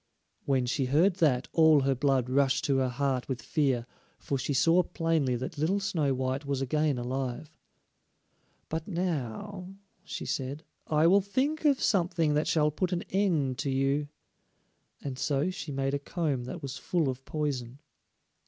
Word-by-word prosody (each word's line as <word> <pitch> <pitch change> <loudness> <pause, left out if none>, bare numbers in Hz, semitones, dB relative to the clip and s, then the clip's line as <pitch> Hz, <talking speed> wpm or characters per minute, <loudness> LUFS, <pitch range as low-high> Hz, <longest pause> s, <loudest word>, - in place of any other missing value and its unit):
When 135 -3 +2
she 130 +2 0
heard 165 +8 +3
that, 140 -7 +2
all 160 -3 +6
her 135 0 +2
blood 130 -1 +1
rushed 135 +2 +2
to 140 -3 +2
her 130 -1 +1
heart 130 0 -1
with 130 -2 -2
fear, 135 -4 0 0.3
for 140 - -3
she 145 - -2
saw 165 +6 +4
plainly 165 -7 0
that 130 +4 -5
little 180 +7 +1
Snow 160 -7 0
white 130 +2 -2
was 140 -2 -2
again 150 +1 +1
alive. 130 +4 -4 1.1
"But 160 0 -4
now," 180 - -3 0.3
she - - -6
said, 140 +3 -3 0.2
"I 155 0 +3
will 195 +4 +6
think 275 +10 -1
of 280 -3 +4
something 170 -5 +1
that 150 +1 +1
shall 150 -2 +2
put 180 +4 -2
an 175 -1 -1
end 165 -10 +1
to 140 - -1
you," 135 +2 +1 1.0
and 135 -2 -5
so 145 +6 0
she 165 -4 -6
made 135 0 -1
a 140 - 0
comb 140 -4 -2
that 125 - -7
was 135 0 -5
full 165 +3 0
of 130 0 -3
poison. 135 -5 -3
145 Hz, 165 wpm, -29 LUFS, 130-165 Hz, 1.1 s, all